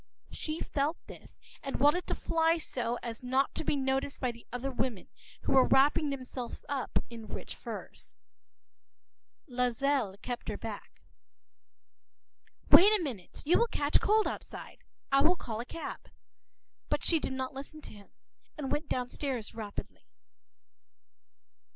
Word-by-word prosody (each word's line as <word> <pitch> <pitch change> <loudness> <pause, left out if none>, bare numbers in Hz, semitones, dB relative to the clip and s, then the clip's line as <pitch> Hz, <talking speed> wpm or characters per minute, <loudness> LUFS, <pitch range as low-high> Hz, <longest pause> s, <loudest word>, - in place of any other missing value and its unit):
She 310 +1 -4
felt 290 +4 0
this, - - -12 0.2
and 275 - -3
wanted 295 +7 +4
to - - 0
fly 325 0 +2
so 245 -6 -2
as 230 -1 -5
not 260 +2 +1
to 320 - -3
be 295 - +1
noticed 270 0 0
by 255 -2 +1
the 235 0 -16
other 250 +3 -2
women, 250 -5 -2 0.3
who - - -2
were 265 -1 +6
wrapping 290 +3 +5
themselves 255 -3 -5
up 280 -2 -1
in 225 -2 -8
rich - - -6
furs. - - -8 1.3
Loisel 250 -3 +1
kept 245 -1 -4
her - - -2
back— - - -8 1.7
“Wait 400 +4 +10
a - - -2
minute; 225 - -6
you 330 - +5
will 470 - +4
catch 290 -9 +2
cold 430 +1 +4
outside; - - -6 0.3
I’ll 290 +6 +5
call 225 -9 -5
a 235 - -3
cab.” 330 - -7 0.8
But - - 0
she 330 - +4
did 265 - -3
not 260 0 -3
listen 280 +3 -7
to - - -10
him, 205 -1 -14 0.5
and 280 -3 -3
went 300 +1 -1
downstairs 250 -1 -2
rapidly. 215 -3 -7
270 Hz, 145 wpm, -31 LUFS, 245-295 Hz, 1.7 s, Wait